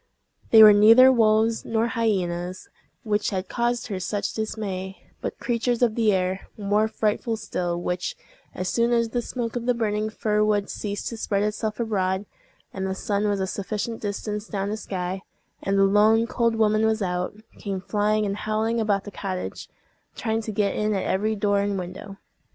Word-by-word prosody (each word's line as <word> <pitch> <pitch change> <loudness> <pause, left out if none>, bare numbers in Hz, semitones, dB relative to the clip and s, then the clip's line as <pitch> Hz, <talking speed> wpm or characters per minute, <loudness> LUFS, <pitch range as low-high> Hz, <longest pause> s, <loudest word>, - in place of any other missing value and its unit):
They 220 -1 +9
were 210 -1 +10
neither 225 +6 +8
wolves 225 -1 +3
nor 230 +1 0
hyenas 185 -6 -1 0.4
which 210 -1 0
had 190 -1 -3
caused 240 0 -1
her 200 -5 -4
such 200 +3 -2
dismay, 195 -3 -4 0.2
but - - -4
creatures 240 0 0
of 235 -3 +3
the 220 -2 +2
air, 185 0 -1
more 210 +1 +1
frightful 220 +1 -1
still, 175 -5 -3
which, 180 - -3 0.4
as 185 - -3
soon 235 +4 +1
as 230 -1 +2
the 240 +2 -1
smoke 235 -1 -4
of 240 0 -3
the 245 - +3
burning 215 -2 -1
fir 210 -1 0
wood 205 -1 +1
ceased 205 -1 -4
to 230 - -7
spread 200 -2 0
itself 210 +1 -2
abroad, 195 -4 0 0.5
and 190 0 -3
the 190 - -2
sun 205 +1 -1
was 200 -1 0
a 190 - 0
sufficient 210 +4 -4
distance 210 +1 -4
down 200 0 -3
the - - -1
sky, 185 -2 -4 0.4
and 195 0 0
the 195 - +5
lone 210 +3 +4
cold 235 -1 0
woman 215 -1 +2
was 220 -1 +1
out, 180 +1 -2 0.2
came 195 -2 -3
flying 210 +2 0
and 200 0 -2
howling 220 +2 -1
about 205 -3 +1
the 205 - -8
cottage, 185 -2 -5 0.5
trying 225 -1 -1
to 220 - -5
get 200 -1 0
in 210 0 0
at 190 - -1
every 215 +3 0
door 205 -1 +1
and 200 0 -1
window. 190 +2 -7
210 Hz, 185 wpm, -24 LUFS, 195-225 Hz, 0.5 s, were